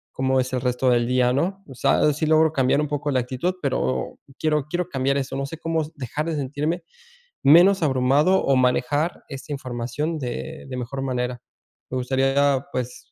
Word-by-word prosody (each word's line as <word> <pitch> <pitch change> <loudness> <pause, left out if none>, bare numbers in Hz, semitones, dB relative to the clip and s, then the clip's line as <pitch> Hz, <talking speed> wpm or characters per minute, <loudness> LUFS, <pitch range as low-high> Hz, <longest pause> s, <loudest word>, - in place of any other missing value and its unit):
cómo 130 0 +1
es 130 0 -2
el 125 - 0
resto 125 +1 +1
del 120 -1 +2
día, 125 0 +2
¿no? 190 +8 -1
O 135 - -10
sea, 150 +4 +3
sí 150 +3 -2
logro 160 0 +4
cambiar 135 0 +2
un 150 - -1
poco 145 0 -2
la 130 - +2
actitud, 130 +9 -2
pero 65 - -1 0.2
quiero 150 -3 +1
quiero 175 +2 -1
cambiar 135 -2 0
eso. 135 -1 -3
No 140 - -2
sé 165 - -8
cómo 165 0 -1
dejar 145 +3 -4
de 165 - -1
sentirme 150 +5 -2 0.6
menos 175 +6 +6
abrumado 140 +6 +3
o 135 - +3
manejar 130 +6 +1
esta 135 +1 -8
información 130 +5 -3
de 145 +5 -5
de 130 - -5
mejor 125 +2 -4
manera. 125 -2 -2 0.5
Me - - -3
gustaría, 135 +2 +1
pues, 125 -1 -5
135 Hz, 185 wpm, -23 LUFS, 125-155 Hz, 0.6 s, menos